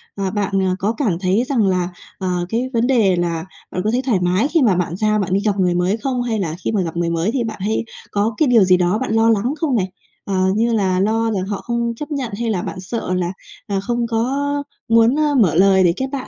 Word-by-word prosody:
ờ, 195 -2 -2
bạn, 205 -1 -2
ờ, 185 0 +1
có 210 +4 0
cảm 195 - 0
thấy 195 +5 +1
rằng 230 -8 +2
là, 180 -1 0 0.3
ờ, 180 -2 -2
cái 245 +3 -1
vấn 235 +1 +2
đề 215 -8 +3
là 170 -1 -2 0.3
bạn 180 - -2
có 215 - +1
thấy 250 +2 +1
thoải 240 -8 +1
mái 180 +8 +1
khi 325 -1 +2
mà 210 -8 +4
bạn 175 -1 -1
ra 215 +1 +1
bạn 185 -1 -1
đi 195 - +3
gặp 200 -2 +1
người 180 -1 +2
mới 180 +5 +1
không? 250 +1 -2
Hay 225 -3 -1
là 165 -4 -2
khi - - +1
mà 205 -3 +1
gặp 170 -1 -4
người 170 -1 0
mới 170 +6 0
thì 245 -2 -1
bạn 220 -3 -5
hay 220 +3 -1 0.3
có 210 +2 0
cái 310 - +3
điều 230 -5 +5
gì 185 -1 +4
đó 180 +3 +1
bạn 260 - -2
lo 225 0 +4
lắng 225 +5 +1
không 285 -6 +1
này, 185 -3 -1 0.3
ờ, 195 - -3 0.2
như 230 +1 +1
là 190 -4 +1
lo 225 +3 +1
là 205 -3 -1
họ 200 -1 -3
không 235 -1 -2
chấp 295 +5 -7
nhận 265 -6 -3
hay 235 -1 -1
là 185 -5 0
bạn 185 - -6
sợ 185 0 -4
là, 180 0 -1 0.3
à, 200 -1 -1
không 235 +3 -1
có 265 +5 -1 0.3
muốn, 230 +5 +4
a, 300 -1 +2
mở 170 -8 +3
lời 190 0 +5
để 170 -1 +4
kết 265 - -2
bạn 275 -2 -4
210 Hz, 265 wpm, -19 LUFS, 185-235 Hz, 0.3 s, điều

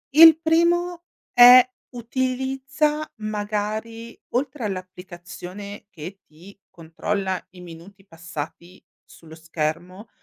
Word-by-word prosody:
il 320 0 +9
primo 345 +2 +1 0.3
è 245 +1 +9 0.3
utilizza 265 +5 -2
magari, 215 +2 -4
oltre 260 -1 -2
all'applicazione 185 +1 -8
che 180 +2 -10
ti 180 +6 -17
controlla 185 +3 -4
i 180 -1 -14
minuti 180 +4 -13
passati 170 +1 -9 0.2
sullo 160 -1 -16
schermo 165 +6 -5
205 Hz, 90 wpm, -23 LUFS, 180-255 Hz, 0.3 s, il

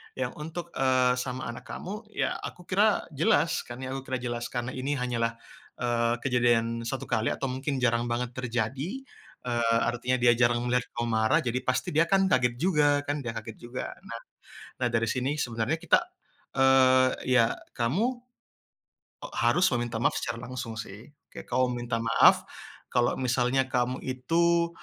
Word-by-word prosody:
yang 125 -1 -2
untuk, 170 +3 -6
eee, 130 -1 +3
sama 125 0 -4
anak 120 - -10
kamu 210 +5 -6
ya - - -1
aku 180 - -8
kira 205 +2 +2
jelas 165 +2 +2
kan 120 +1 -8
ya, 130 - -4
aku 135 - -5
kira 130 -1 -2
jelas 120 -1 -3
karena 120 0 -3
ini 135 +3 -2
hanyalah, 120 -3 -1 0.4
eee, 120 -1 +1
kejadian 120 -2 +2
1 135 - -3
kali 110 -2 +1
atau 135 - -2
mungkin 135 +1 -2
jarang 120 -1 +1
banget 120 0 -1
terjadi, 130 - -3 0.4
eee, 120 -2 +1
artinya 120 +2 0
dia 120 0 +5
jarang 120 0 +2
melihat 125 0 +1
kamu 120 0 -1
marah, 110 0 +3
jadi 125 +1 -1
pasti 130 0 -1
dia 165 +1 +4
kan 195 +2 +3
kaget 125 -2 +3
juga 145 -5 +3
kan, 145 0 -2
dia 115 - -3
kaget 110 0 -7
juga. 120 +1 -6 0.9
Nah, 125 - +2
dari 115 0 +1
sini 130 +5 -1
sebenarnya 120 +5 -1
kita, 175 - +4 0.6
eee, 130 -1 +5 0.2
ya 120 -3 +3 0.2
kamu 130 - +1 1.3
harus 120 +11 +3
meminta 120 -1 -3
maaf - - +2
secara 115 - -3
langsung 125 -3 -5
sih, 110 -1 -8 0.2
kayak - - -10
kamu 130 - +2 0.2
minta 115 -1 -1
maaf 115 0 +5 0.4
kalau 120 -1 +2
misalnya 125 +1 +1
kamu 125 0 0
itu, 170 +6 +1
125 Hz, 160 wpm, -28 LUFS, 120-135 Hz, 1.3 s, dia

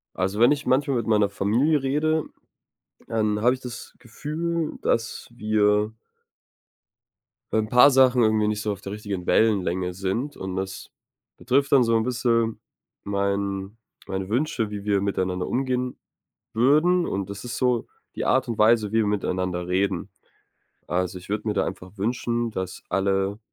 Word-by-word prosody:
Also, 95 +3 -1
wenn 120 +5 +6
ich 145 - -5
manchmal 135 +1 +2
mit 115 -2 -1
meiner 105 -2 +3
Familie 125 +10 +1
rede, 155 +3 +1 0.8
dann 105 -2 0
habe 125 +3 +4
ich 130 - -9
das 125 -2 -8
Gefühl, 155 +6 -3
äh, - - -9
dass 115 0 -1
wir 105 -1 +2 1.6
ein 110 -1 +1
paar 125 +4 +7
Sachen 130 -2 +5
irgendwie 110 -1 +2
nicht 105 0 -1
so 105 - -1
auf 100 - -6
der 100 - -7
richtigen 100 -4 -5
Wellenlänge 95 -4 +2
sind 100 +10 -3
und 95 -1 -5
das 95 0 -5 0.5
betrifft 135 +3 +1
dann 135 -3 +6
so 115 -1 +2
'n 110 - +2
bisschen 115 -2 0 0.4
mein 100 +1 -2 0.3
meine 95 0 -4
Wünsche, 120 -2 0
wie 100 -1 -5
wir 100 -1 +1
miteinander 95 -2 -1
umgehen 125 -1 -1 0.6
würden 155 +9 +3
und 95 0 -3
das 100 0 -7
ist 120 - -4
so 125 -3 +1 0.3
die - - -3
Art 130 0 +2
und 115 -2 -3
Weise, 110 -1 +4
wie 110 - +1
wir 110 - +2
miteinander 95 -3 -1
reden. 95 0 0 0.8
Also, 90 +1 -1
ich 90 - -15
würde 105 +1 -2
mir 105 - 0
da 95 - +1
einfach 90 +3 -8
wünschen, 120 +2 -1
dass 95 -3 -5
alle 95 +1 0
110 Hz, 160 wpm, -24 LUFS, 100-125 Hz, 1.6 s, paar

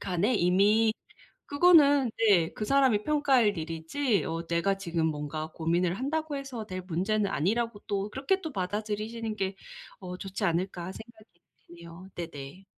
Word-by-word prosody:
간에 195 +6 0
이미 205 +4 +3 0.5
그거는 285 -4 +5
네 195 -7 +4
그 215 - -3
사람이 260 -6 +3
평가할 270 -8 +3
일이지 165 - -1
어 165 +1 -4
내가 170 +4 +1
지금 170 -4 -1
뭔가 155 0 -4
고민을 170 +2 0
한다고 305 +2 -2
해서 260 -6 -6
될 185 -2 -5
문제는 200 +4 0
아니라고 215 +7 -1
또 200 0 -2
그렇게 280 - 0
또 320 - -5
받아들이시는 215 +3 -3
게 195 -1 -2 0.4
어 180 -1 -6
좋지 195 +2 -5
않을까 175 0 -1
생각이 220 +1 -14 0.4
드네요. 170 +2 -12
네네. 165 +1 -8
200 Hz, 315 characters per minute, -28 LUFS, 170-235 Hz, 0.5 s, 그거는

